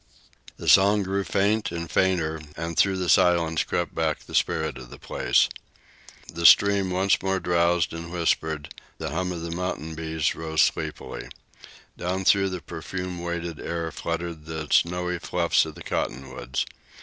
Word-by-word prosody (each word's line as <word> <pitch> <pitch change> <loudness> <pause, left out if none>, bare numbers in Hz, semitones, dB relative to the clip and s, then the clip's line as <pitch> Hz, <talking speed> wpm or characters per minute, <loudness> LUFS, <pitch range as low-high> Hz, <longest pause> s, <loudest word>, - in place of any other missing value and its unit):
The - - -8
song 100 +1 +6
grew 95 +1 -1
faint 105 +2 +1
and 85 -1 -4
fainter, 80 -3 +1 0.2
and 85 0 -4
through 95 +2 +3
the 90 -1 -2
silence 85 -3 +3
crept 85 -1 -2
back 80 -2 -1
the - - -14
spirit - - 0
of 60 -2 -11
the - - -11
place. - - +2 0.9
The 85 +1 -5
stream 100 +1 +6
once 95 +2 +2
more 95 0 0
drowsed 85 -1 +2
and 85 0 -7
whispered; 80 -3 -1 0.2
the - - -4
hum 90 +3 -1
of 85 -2 -5
the 85 - -4
mountain 85 -3 -3
bees 80 0 -1
rose 80 -1 0
sleepily. - - -2 0.7
Down 95 +2 -2
through 95 0 +4
the 90 -2 -5
perfume 90 -1 -5
weighted 85 -2 -4
air 85 -1 -3
fluttered 85 -2 -4
the 80 -1 -5
snowy 90 0 +2
fluffs 85 -2 +1
of 80 - -9
the - - -10
cottonwoods. 65 0 -3
85 Hz, 160 wpm, -25 LUFS, 80-90 Hz, 0.9 s, song